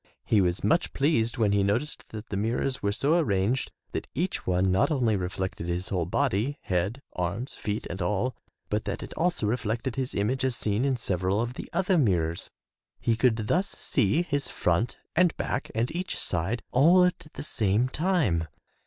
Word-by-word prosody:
He 105 - +4
was 90 0 0
much 165 +2 +2
pleased 130 -5 +1
when 110 -3 +3
he 100 0 +3
noticed 110 +10 -1
that 110 0 -8
the - - -3
mirrors 115 +6 -1
were 100 - +1
so 145 +10 +2
arranged 105 - +1 0.2
that - - -4
each 180 +7 -2
one 90 +1 +2
not 95 - +3
only 125 -8 +2
reflected 90 -2 -3
his 85 +2 -2
whole 90 -4 -1
body, 135 +4 0
head, 95 +9 -1
arms, 90 +9 -3
feet 105 +1 -3
and 95 +2 -5
all, 105 +7 0 0.3
but 105 +1 -1
that - - -3
it - - -8
also 175 -8 0
reflected 115 +3 -1
his 130 -1 -1
image 125 +6 0
as 130 -2 +1
seen 105 +4 0
in 135 -2 +2
several 95 -3 0
of 120 +2 -1
the - - -8
other 180 0 +2
mirrors. 85 - +1 0.5
He 115 - +1
could 115 -2 +2
thus 185 - +2
see 130 - +1
his 145 -5 -1
front 90 +7 0 0.2
and 175 0 +3
back 125 - -2
and 120 +7 0
each 180 +1 -3
side, 95 +7 -1
all 170 +8 +6
at 180 -3 -2
the - - -6
same 110 -3 +1
time. 130 - +1
115 Hz, 185 wpm, -27 LUFS, 95-140 Hz, 0.5 s, all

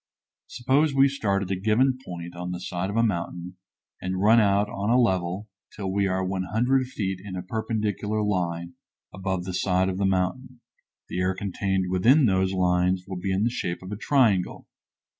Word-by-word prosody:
Suppose 135 +4 +1
we 135 0 +6
start 100 -8 0
at 95 - -5
a - - +1
given 115 +7 +2
point 85 -3 -7
on 90 +1 -5
the 90 0 -4
side 90 +1 -3
of 100 - -4
a 115 - +4
mountain 90 -3 -3 0.4
and 95 0 -2
run 110 +4 +6
out 100 -1 +3
on 100 +1 -3
a 125 +2 +4
level 95 -2 0 0.3
till 95 -2 -3
we 100 0 +2
are 95 0 -1
100 110 +8 0
feet 95 -7 -3
in 100 -2 -7
a 90 - -4
perpendicular 110 0 -2
line 85 -4 -2 0.4
above 95 -1 -2
the 90 0 -5
side 95 0 +1
of 95 0 -3
the 100 - +2
mountain, 95 +7 -1 0.5
the 90 - -4
air 90 +1 +1
contained 95 -1 -2
within 125 +11 +5
those 95 -3 +2
lines 90 0 +1
will 95 -2 -5
be 95 +1 -2
in 95 +2 +1
the 120 - +1
shape 90 -6 -4
of 95 - -8
a - - -2
triangle. 110 -5 +1
95 Hz, 190 wpm, -25 LUFS, 90-110 Hz, 0.5 s, we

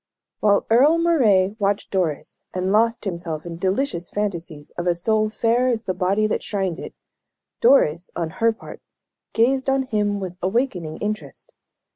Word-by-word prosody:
While 205 -1 +3
Earle 280 +8 +5
Moray 220 - +3
watched 200 0 -1
Doris, 175 -7 -2
and 185 +1 -1
lost 230 +2 +2
himself 170 -4 -4
in 170 -1 -6
delicious 190 0 -1
fancies 170 -7 -4
of 175 +1 -5
a 175 - +3
soul 215 +4 +1
fair 235 +3 +1
as 235 -3 0
the 185 - -2
body 190 +4 +1
that 215 - -1
shrined 190 -4 -2
it, - - -8 0.6
Doris, 180 - +3
on 165 -2 -3
her 230 0 +5
part, 225 - -11 0.5
gazed 260 +4 +2
on 270 0 +2
him 210 -4 -1
with 185 -2 -6
awakening 185 - -1
interest. 215 - -6
205 Hz, 155 wpm, -22 LUFS, 175-230 Hz, 0.6 s, Earle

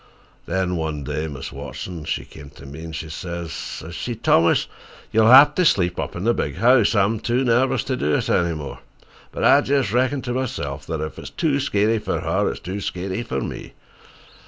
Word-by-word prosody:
Then 90 -1 -1
one 80 -3 -3
day 75 +3 -3
Mis' 70 -3 -7
Watson, 75 +4 -7
she - - -3
came 75 -3 -12
to - - -13
me 70 +4 -9
an' 80 - -7
she 80 0 -5
sez, 85 +1 -6
sez 80 +2 -7
she, 120 +7 -4
'Thomas, 85 -6 +3 0.5
you'll 110 0 +4
hev 135 +4 +9
to 180 - +2
sleep 90 - +2
up - - -4
in 85 - -4
the 120 +2 +3
big 70 -9 -2
house. 120 -2 +4
I'm 105 +2 +2
too 120 +4 0
nervous 125 +1 +2
to 130 - -2
do 75 -11 0
it - - -1
any 85 -2 +1
more.' 75 -3 -7 0.5
But - - -4
I - - +7
jes' 135 -6 +1
reckon 130 +3 +1
to 125 - -3
myself 130 -1 -4
that 80 -2 -3
ef 80 -3 -5
it's - - -8
too 150 -4 0
skeery 110 -4 +1
fer - - -2
her, - - 0
it's - - -5
too 95 +4 -5
skeery 95 +3 -3
fer 115 - -3
me. - - -6
95 Hz, 205 wpm, -22 LUFS, 80-120 Hz, 0.5 s, hev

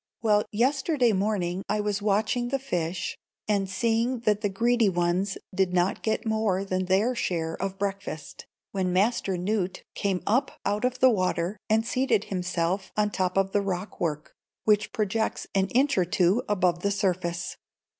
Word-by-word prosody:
Well, 210 -2 +3
yesterday 260 +2 +2
morning 190 -2 0
I 210 - +1
was 205 -1 -1
watching 215 +4 +1
the 275 +2 0
fish, 180 -10 -3 0.3
and 200 -2 +1
seeing 230 +5 0
that 210 -3 +1
the 205 - +1
greedy 230 +2 +2
ones 175 +2 0 0.2
did 185 -1 +1
not 180 +2 +1
get 220 +1 -1
more 220 -3 +1
than 185 -1 -1
their 195 +7 +2
share 165 -8 -1
of 195 0 -3
breakfast, 195 -6 -5 0.2
when 185 -2 -1
Master 195 0 +1
Newt 190 0 -1
came 195 -3 -1
up 255 +6 +1
out 210 +4 0
of 250 0 0
the 260 0 +7
water 185 -2 0
and 220 +1 +3
seated 250 -3 +1
himself 185 +1 -1
on 210 0 +3
the - - -19
top 185 0 0
of 195 0 +2
the 205 - +2
rock 190 0 -4
work, 155 -3 -2 0.3
which 210 -1 +2
projects 220 +1 -1
an 195 -1 +2
inch 270 +7 +2
or 180 - +3
two 180 +6 +2
above 180 -4 +2
the 200 - 0
surface. 180 -3 -1
200 Hz, 170 wpm, -27 LUFS, 185-220 Hz, 0.3 s, the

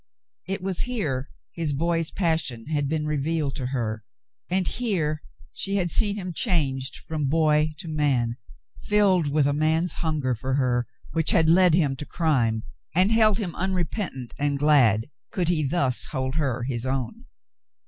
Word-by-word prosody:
It 190 -1 -3
was 190 -2 -2
here 155 - -2 0.2
his 160 -4 -2
boy's 165 +2 0
passion 160 - -1
had 145 -2 -1
been 155 0 -1
revealed 150 -1 -1
to 130 -3 -3
her, 110 -4 -3 0.5
and 185 0 +1
here 165 -11 -1 0.3
she 195 - -2
had 175 -4 0
seen 205 -3 +3
him 185 -4 -5
changed 140 - 0
from 155 -3 -3
boy 155 +1 +3
to 175 +1 -8
man, 135 -7 0 0.4
filled 195 -6 +3
with 145 0 +2
a 145 - +2
man's 160 +4 +1
hunger 150 -6 0
for 130 +3 -2
her, 125 -3 +1 0.2
which 160 +1 +3
had 160 -1 +5
led 180 -1 +6
him 145 -6 +2
to 150 - -6
crime, 120 -10 +1 0.3
and 185 +4 +4
held 220 -2 +4
him 190 -7 -3
unrepentant 180 - -3
and 145 0 0
glad 130 -7 +4 0.2
could 175 -3 0
he 160 -3 +2
thus 140 -3 +1
hold 130 -2 -3
her 135 -6 -1
his 120 -2 -3
own. 135 - -3
155 Hz, 160 wpm, -25 LUFS, 135-175 Hz, 0.5 s, led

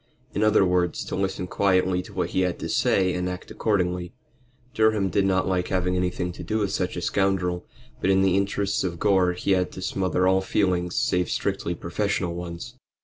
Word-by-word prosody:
In - - -1
other 110 -2 +4
words, 90 -2 0
to - - -4
listen 95 -1 -2
quietly 95 -1 +2
to - - -12
what - - -1
he 95 - +1
had 90 -2 0
to - - -5
say 95 -2 +2
and 90 0 -2
act 90 0 -7
accordingly. 90 -4 -1 0.6
Durham 110 -3 +2
did 100 +1 +2
not 95 -1 +1
like 90 -1 0
having 90 -1 0
anything 90 0 -1
to - - -9
do 110 - -1
with 100 -3 0
such 90 -1 -2
a 90 - -4
scoundrel, 90 -3 0 0.3
but 95 - +1
in 95 0 +4
the 95 -1 +3
interests 100 0 0
of 85 -2 -3
Gore 95 -2 +3
he 90 +2 -2
had 90 -1 +2
to 95 - -7
smother 95 -1 0
all 95 0 +3
feelings 90 -3 0
save 90 -1 +1
strictly 85 - -2
professional 90 +1 -2
ones. 85 +7 -6
95 Hz, 200 wpm, -25 LUFS, 90-95 Hz, 0.6 s, other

